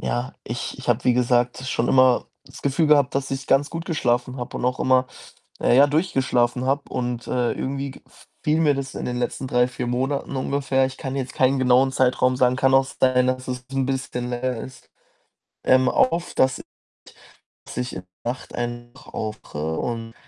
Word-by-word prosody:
ja, - - -2
ich - - -5
ich - - -9
habe, - - +2
wie 125 - +5
gesagt, 125 0 +2
schon 120 -2 0
immer 130 -1 +4 0.2
das - - -13
Gefühl 145 +3 +2
gehabt, 145 -3 +4
dass 135 -1 -1
ich 135 -1 -4
ganz 140 +2 +3
gut 165 0 -5
geschlafen 125 -6 0
habe 125 -2 -5
und - - -4
auch 125 +1 0
immer, 130 0 +3 0.5
na - - +3
ja, 140 +3 +7
durchgeschlafen 130 -6 +1
habe. 140 +2 +1
Und, 120 -1 -3
äh, 125 -1 0
irgendwie 135 +1 -3
g - - -14 0.4
fiel 155 +1 +2
mir 150 -3 +4
das 135 -1 -5
in - - -4
den 125 0 -2
letzten 125 +2 -2
3, 125 0 +3
4 125 -1 -5
Monaten 135 +3 -2
ungefähr 135 0 +1
ich 130 - -10
kann 135 0 -5
jetzt 130 -2 -3
keinen 130 +1 +2
genauen 130 +1 +4
Zeitraum 130 -1 +2
sagen. 125 0 +3
Kann 135 +1 +2
auch 135 0 +5
sein, 130 -1 +3
dass 130 0 -2
es 125 -1 -4
'n 135 -1 0
bisschen 130 -2 -3
länger 125 0 -2
ist 125 -11 -11 0.7
ähm, 130 0 +4
auf, 170 +6 +1
dass 130 0 +2 1.0
dass - - -10
ich 125 0 -3
in 90 - -6 0.2
der 120 - +1
Nacht 130 - -14
einfach 120 +2 -6
aufwache 80 -8 -4
und 115 -1 -4
130 Hz, 190 wpm, -23 LUFS, 125-135 Hz, 1.0 s, ja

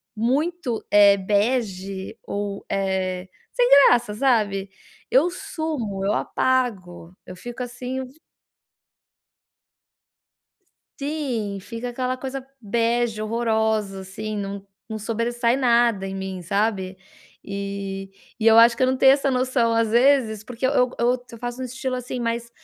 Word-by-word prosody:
muito, 265 +3 -1
eh, 205 -1 +7
bege 200 -2 -1
ou, 200 -1 -4
eh, 190 -1 -2 0.2
sem - - +3 0.2
graça, 240 -4 +2
sabe, 210 -6 +1 0.4
eu 285 +7 +4
sumo, 300 - -4
eu 200 +2 +1
apago, 190 -10 -1
eu 185 - -8
fico, 240 +6 -8
assim, 250 +1 -4
um 260 - -7 2.9
Sim, 265 -9 -3
fica 230 +5 -6
aquela 255 +1 -2
coisa 265 +1 -6 0.2
bege 230 +1 0
horrorosa, 220 -3 0
assim, 210 +3 -6
não 200 0 -5 0.2
não 220 -1 -5
sobressai 235 +2 0
nada 235 -6 +3
em 195 - -5
mim, 190 -1 -5
sabe. 195 0 -1 0.5
E 195 -1 -5 0.3
e 220 - +2
eu 225 0 +7
acho 235 +1 +7
que 260 - +2
eu 255 - +4
não 260 - +2
tenho 265 +1 +6
essa 275 0 +2
noção, 250 -2 +1
às 230 -1 +2
vezes, 240 -2 +3
porque 245 +2 -4
eu 260 - +2 0.3
eu 245 +2 +2
eu 230 - -10
faço 245 +2 -5
um - - -2
estilo 255 +1 -4
assim 250 0 -5
mais 235 0 -2
230 Hz, 135 wpm, -23 LUFS, 200-250 Hz, 2.9 s, eh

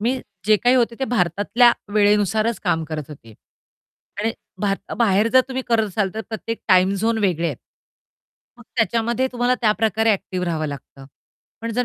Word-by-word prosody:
मी 250 +4 0 0.3
जे 215 -1 +5
काही 245 +4 +3
होते 235 -1 +1
ते 265 - +1
भारतातल्या 220 +2 +3 0.2
वेळेनुसारच 210 +2 +2
काम 165 -3 +1
करत 155 -1 -5
होते 115 -7 -13 0.9
आणि 225 +1 0 0.3
भार 200 -2 +1 0.2
बाहेर 215 -1 +3
जर 260 - +7
तुम्ही 260 0 -3
करत 225 -2 +2
असाल, 195 0 -1
तर 220 - -3
प्रत्येक 230 0 -5
टाईम 185 +1 +4
झोन 225 +3 0
वेगळे 175 -5 0
आहेत. 145 -7 -3 1.0
मग - - -13
त्याच्यामध्ये 235 +2 +1
तुम्हाला 245 +1 +1
त्या 215 -3 +3
प्रकारे 220 +1 +1
ॲक्टिव्ह 185 -2 -3
राहावं 160 -2 -1
लागतं. 140 -1 -9 0.5
पण 230 0 -4
जर 245 +2 0
215 Hz, 165 wpm, -21 LUFS, 185-230 Hz, 1.0 s, जर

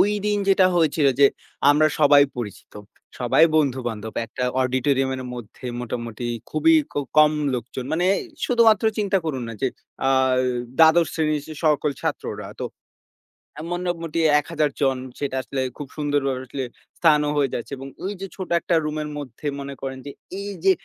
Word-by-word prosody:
ওই 205 - +4 0.2
দিন 210 0 +1
যেটা 190 -1 +5
হয়েছিল 155 -3 +3
যে, 140 - +9 0.4
আমরা 150 +2 +4
সবাই 145 -1 +7 0.2
পরিচিত। 105 -4 -7 0.5
সবাই 125 +6 +5
বন্ধু-বান্ধব 120 -7 -1
একটা 125 +3 -4 0.2
অডিটোরিয়ামের 130 +1 0
মধ্যে 120 +1 -9
মোটামুটি 120 -1 -5 0.2
খুবই 325 - +4 0.2
ক - - -21 0.2
কম 155 0 +7 0.2
লোকজন 125 +1 -5
মানে 175 +3 +1 0.4
শুধুমাত্র 230 -4 +4
চিন্তা 200 -2 +2
করুন 135 -6 -2
না - - -5
যে, 135 - +3 0.4
আ - - +3 0.7
১২তম 160 +1 +6
শ্রেণীর 155 -2 0 0.2
সকল 150 -1 +3
ছাত্ররা - - -4
তো - - -2 1.0
এ - - -5
মোটামুটি 170 -2 -2 0.2
১000 150 -1 -1
জন 135 -2 +2 0.2
সেটা 140 -2 -2
আসলে 135 0 -4 0.2
খুব 145 - -6
সুন্দরভাবে 145 -3 0
আসলে 135 +1 -4 0.4
স্থানও 150 -3 +4
হয়ে 140 -3 +2
যাচ্ছে, 120 - -5
এবং 135 +1 -8 0.2
ওই 195 +2 -2
যে, - - -3
ছোট 185 -2 -6
একটা 170 - 0
রুমের 150 0 -3
মধ্যে 145 0 -7
মনে 140 0 -6
করেন 135 -1 -5
যে, 140 - -6 0.3
এই 200 0 -5
যে, 195 - +6
145 Hz, 155 wpm, -23 LUFS, 130-165 Hz, 1.0 s, যে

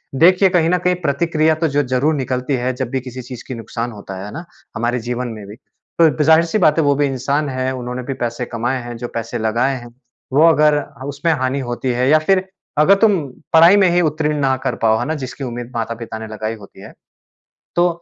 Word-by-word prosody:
देखिए 185 +5 +5
कहीं 170 -3 +2
न 180 - +3
कहीं 180 +1 +1
प्रतिक्रिया 155 +2 +2
तो 165 - +4
जो 145 0 +1
ज़रूर 135 +5 +1
निकलती 130 0 -2
है 125 +1 -1
जब 125 -1 -4
भी 130 - -1
किसी 130 0 -8
चीज़ 125 -1 -9
की 130 - -5
नुकसान 115 +1 -5
होता 100 -3 -9
है, 95 - -6
है 105 - -8
ना? 170 +3 -7 0.3
हमारे 120 +2 -1
जीवन 125 0 -2
में 105 - -9
भी। 105 - -10 0.5
तो 150 -3 +4
ज़ाहिर 160 +2 +5
सी 170 +5 -1
बात 160 -6 +3
है 160 - +3
वो 145 0 +3
भी 145 +1 +2
इंसान 140 +2 -1
है 130 0 -2
उन्होंने 125 0 -5
भी 135 - -4
पैसे 120 +1 -3
कमाए 120 +2 -2
हैं, 120 0 -7
जो 120 +1 -5
पैसे 115 +1 -4
लगाए 120 +5 0
हैं 120 0 -13 0.4
वो 155 +4 +6
अगर 150 -2 +4 0.3
उसमें 145 +4 -1
हानि 130 0 -1
होती 120 +2 -3
है 125 +2 +1
या 155 - +6
फ़िर 185 +4 +1 0.3
अगर 170 +6 +6
तुम 210 -3 +5 0.4
पढ़ाई 165 +4 +8
में 190 -2 +5
ही 175 +1 +3
उत्तीर्ण 155 -1 0
ना 135 -1 +2
कर - - -1
पाओ, 110 0 +4
है - - -2
ना? 155 - -1
जिसकी 135 0 -6
उम्मीद 120 0 -6
माता-पिता 115 0 -4
ने 110 - -7
लगाई 110 +1 -4
होती 100 -2 -15
है। - - -11 0.8
तो 175 +1 +4
130 Hz, 230 wpm, -18 LUFS, 120-155 Hz, 0.8 s, पढ़ाई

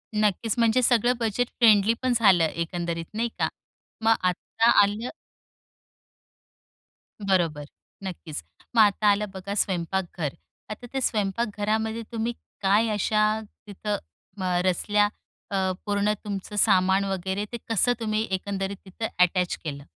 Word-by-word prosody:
नक्कीच, 210 +1 +1
म्हणजे 230 +2 +4
सगळं 240 0 +4
बजेट 230 +1 0
फ्रेंडली 220 -2 +5
पण 255 -1 +1
झालं 190 -7 +5
एकंदरीत 170 +1 -2
नाही 230 +2 -1
का? - - +2 0.5
मग 225 0 +4
आता 225 +5 0
आलं 210 +4 0 2.1
बरोबर. 175 -7 0 0.4
नक्कीच. 170 - -6 0.3
मग 225 - +7
आता 210 0 +3
आलं 205 +1 +1
बघा 190 +1 -5
स्वयंपाकघर. 175 -4 -3 0.4
आता 215 +3 -7
ते 265 - -1
स्वयंपाकघरामध्ये 220 +1 -1
तुम्ही 230 +1 -2 0.3
काय 205 +4 +3
अशा, 215 +1 +1 0.4
तिथं 205 +1 -3 0.5
अ, 180 -1 +1
रचल्या 205 +3 +2 0.4
अ, 200 - -1 0.3
पूर्ण 205 0 +1
तुमचं 200 0 -5
सामान 190 -1 +4
वगैरे 190 +1 -2
ते 240 - -3
कसं 230 +3 +3
तुम्ही 215 0 -1
एकंदरीत 195 +1 -2
तिथं 195 +4 -4
अटॅच 180 0 +3
केलं? 140 -3 -5
205 Hz, 125 wpm, -25 LUFS, 185-220 Hz, 2.1 s, मग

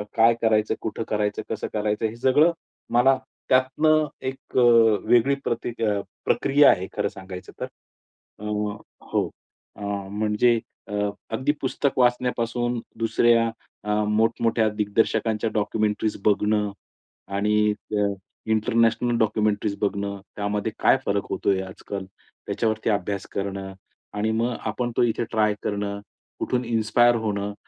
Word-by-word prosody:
काय 115 +1 +6
करायचं? 110 -1 +2
कुठं 110 +1 -3
करायचं? 105 -1 -1
कसं 110 - -3
करायचं? 105 +1 0
हे 110 - -7
सगळं 135 +7 +4 0.4
मला 130 +2 +5 0.3
त्यातनं 150 +4 +3 0.2
एक 130 0 -6
अ, - - +6 0.5
वेगळी 120 +4 +4
प्रतीक 115 0 -3
अ, 105 -2 +1 0.3
प्रक्रिया 145 +2 +5
आहे 95 +1 -1
खरं 105 -1 +1
सांगायचं 95 -2 -9
तर. - - -2 0.7
अ, - - -11 0.7
हो, - - +1 0.5
अ, - - -13 0.3
म्हणजे 110 +3 +2 0.3
अ, - - -6 0.4
अगदी 130 +5 +1
पुस्तक 135 +1 -1
वाचण्यापासून 120 -1 +1 0.2
दुसऱ्या 115 +1 +3 0.4
अ, 105 - -6 0.2
मोठमोठ्या 110 +1 +2
दिग्दर्शकांच्या 110 +1 +1
डॉक्युमेंटरीज 105 0 0
बघणं 105 0 +2 0.6
आणि 105 +1 +2 0.3
अ, 100 -1 +1 0.4
इंटरनॅशनल 115 +1 +2
डॉक्युमेंटरीज 105 -2 +1
बघणं. 100 -1 -2 0.2
त्यामध्ये 105 +1 -2
काय - - +5
फरक 100 -1 0
होतोय 95 -1 +1
आजकाल, 95 +1 -7 0.4
त्याच्यावरती 110 0 0
अभ्यास 100 -1 -1
करणं. 100 -1 -4 0.4
आणि 105 +1 0
मग 115 +2 0
आपण 120 +3 -2
तो - - +5
इथे 120 0 +1
ट्राय 110 -2 +2
करणं, 100 0 -2 0.4
कुठून 125 0 -1
इन्स्पायर 120 +1 +3
होणं. 100 -1 -2
110 Hz, 125 wpm, -24 LUFS, 105-120 Hz, 0.7 s, काय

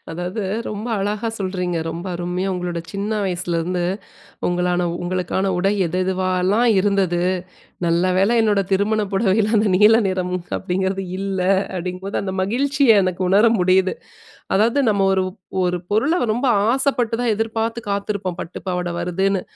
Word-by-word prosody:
அதாவது 180 +5 -4 0.3
ரொம்ப 210 +2 -5
அழகா 210 +3 -2
சொல்றீங்க. 185 -3 -2
ரொம்ப 170 +3 -5
அருமையா 180 +2 -2
உங்களோட 175 -1 -3
சின்ன 200 +2 -3
வயசுலருந்து, 175 -1 -1 0.6
உங்களுக்கான 180 0 0 0.2
உங்களுக்கான 185 +2 -1
உடை 195 +3 +2
எது 180 +3 -2
எதுவாலாம் 185 +4 +1
இருந்தது, 190 -3 +1 0.7
"நல்ல 170 +1 +2
வேள 195 +4 +3
என்னோட 210 -3 +2
திருமண 210 +3 +2
புடவையில 210 +1 +2
அந்த 210 0 +3
நீல 210 +3 +6
நிறம் 185 -1 -1 0.2
அப்படிங்கிறது 190 +1 -2
இல்ல" 195 -1 -2 0.3
அப்படிங்கும்போது 185 +2 -4
அந்த 190 -1 -3
மகிழ்ச்சிய 255 +1 +3
எனக்கு 185 0 -1
உணர 205 +5 +5
முடியுது. 185 +1 +3 0.6
அதாவது 230 +7 +3
நம்ம 200 -2 +2
ஒரு 190 -1 +2 0.4
ஒரு 180 0 0
பொருளை 280 - +2
ரொம்ப 250 +3 0 0.2
ஆசைப்பட்டு 255 -4 +1
தான் 230 -3 +2
எதிர்பாத்து 225 +1 -2
காத்திருப்போம். 200 -3 -2
பட்டு 170 - -7
பாவாடை 180 -1 -2
வருதுன்னு. 190 +2 0
190 Hz, 135 wpm, -21 LUFS, 180-210 Hz, 0.7 s, நீல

